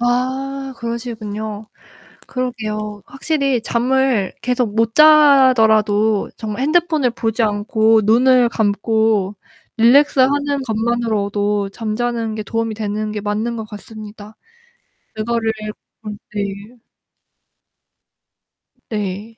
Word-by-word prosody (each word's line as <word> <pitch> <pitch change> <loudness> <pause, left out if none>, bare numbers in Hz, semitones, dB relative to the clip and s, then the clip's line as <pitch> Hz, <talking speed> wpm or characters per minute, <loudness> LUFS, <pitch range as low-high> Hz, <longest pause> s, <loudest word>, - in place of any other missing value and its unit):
아 265 +3 -2
그러시군요. 220 -3 -5 0.6
그러게요. 215 -5 -4
확실히 275 -4 -1
잠을 250 -4 +1
계속 245 -3 -1
못 225 0 +1
자더라도 225 -9 +5
정말 220 +2 -5
핸드폰을 310 -3 +2
보지 225 0 -2
않고 220 +1 +2
눈을 245 +2 +4
감고 215 -1 0 0.4
릴렉스 265 +4 +5
하는 285 +1 +1
것만으로도 210 -3 -1
잠자는 225 +1 -3
게 215 - -4
도움이 225 +1 -3
되는 215 0 -3
게 210 -1 -4
맞는 215 +3 -2
것 220 - -5
같습니다. 210 0 -11 0.8
그거를 225 +1 -1 0.5
음 210 -1 -6 0.2
네. 205 +3 -6 2.1
네. 210 +1 -5
225 Hz, 215 characters per minute, -18 LUFS, 210-250 Hz, 2.1 s, 자더라도